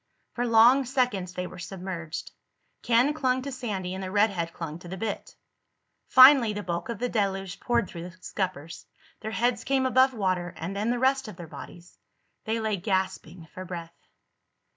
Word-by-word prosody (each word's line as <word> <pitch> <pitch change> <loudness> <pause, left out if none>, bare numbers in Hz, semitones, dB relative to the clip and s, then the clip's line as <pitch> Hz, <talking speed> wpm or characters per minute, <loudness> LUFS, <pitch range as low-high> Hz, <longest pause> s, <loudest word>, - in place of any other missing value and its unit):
For 245 0 -1
long 240 +4 +6
seconds 240 -8 -1
they 180 - -3
were 180 - -9
submerged. 180 -3 -6 0.5
Ken 245 +5 +3
clung 260 -4 0
to 280 - -5
Sandy 205 -8 -4
and 190 0 -5
the 185 - -4
redhead 195 -4 +1
clung 165 -1 -6
to 175 - -12
the 190 +2 -6
bitt. 215 +2 -5 0.7
Finally 260 -4 +8
the 205 0 -5
bulk 170 +2 -4
of 235 - -3
the 245 - -1
deluge 195 -5 -2
poured 235 -4 +1
through 170 0 -8
the 185 - -17
scuppers. 180 -5 -5 0.3
Their 220 - -5
heads 240 +2 0
came 265 -1 +1
above 260 0 +4
water, 185 -4 -1
and 175 +5 -5
then 210 +3 -1
the 245 - +1
rest 265 0 +2
of 215 - -8
their 170 - -9
bodies. 175 +2 -12 0.5
They 225 +1 -1
lay 220 -2 -1
gasping 185 -3 -2
for 185 - -7
breath. 170 -2 -7
200 Hz, 180 wpm, -27 LUFS, 180-245 Hz, 0.7 s, Finally